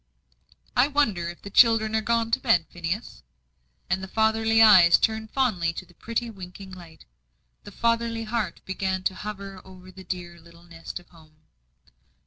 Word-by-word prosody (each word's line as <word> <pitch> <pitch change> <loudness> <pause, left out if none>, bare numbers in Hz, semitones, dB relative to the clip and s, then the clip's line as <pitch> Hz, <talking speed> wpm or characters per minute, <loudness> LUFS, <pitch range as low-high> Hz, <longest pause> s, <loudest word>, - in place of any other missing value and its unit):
"I 245 - +4
wonder 220 - 0
if 175 - -11
the 200 - -9
children 220 -1 +4
are 220 - +2
gone 230 +1 0
to - - +2
bed, 165 -2 +2
Phineas?" 175 +5 -5 0.7
And 190 +1 -1
the 190 - -6
fatherly 220 +2 +2
eyes 190 -6 +8
turned 220 -1 -1
fondly 195 -12 0
to 185 - -7
that 175 -1 -24
pretty 230 +1 -3
winking 190 -1 -11
light; 175 -3 -13 0.6
the - - -10
fatherly 230 0 0
heart 220 -2 -3
began 190 0 -2
to 190 - 0
hover 195 -1 -8
over 185 0 -14
the 190 0 -12
dear 175 -2 -6
little 170 +1 -18
nest 165 -1 -9
of 175 - -21
home. 160 -2 -20
190 Hz, 165 wpm, -25 LUFS, 175-225 Hz, 0.7 s, eyes